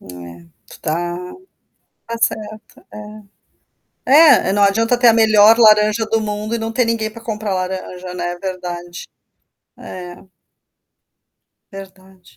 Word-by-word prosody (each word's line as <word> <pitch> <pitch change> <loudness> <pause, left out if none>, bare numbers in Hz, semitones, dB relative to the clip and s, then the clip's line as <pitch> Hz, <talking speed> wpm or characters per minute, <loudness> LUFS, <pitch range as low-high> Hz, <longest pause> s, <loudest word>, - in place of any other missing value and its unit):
É, 85 -1 -12 0.2
tu - - -18
está 175 +3 -5 0.8
está 230 - -4
certa, 215 -1 -3 0.3
é. 210 0 -10 1.3
É, 190 - 0
não 205 - +2
adianta 225 +5 +1
ter 245 0 +3
a 230 - +6
melhor 220 0 +5
laranja 215 -1 +4
do 225 +1 -1
mundo 210 +1 -4
e - - -2
não 225 0 -4
ter 245 +1 0
ninguém 230 -1 -2
para 225 +1 -13
comprar 215 -3 -4
laranja, 185 -1 -6
né, 175 0 -4
verdade. 175 -2 -7 0.7
É. 180 -1 -10 1.6
Verdade. 190 - -15
205 Hz, 125 wpm, -17 LUFS, 180-220 Hz, 1.6 s, a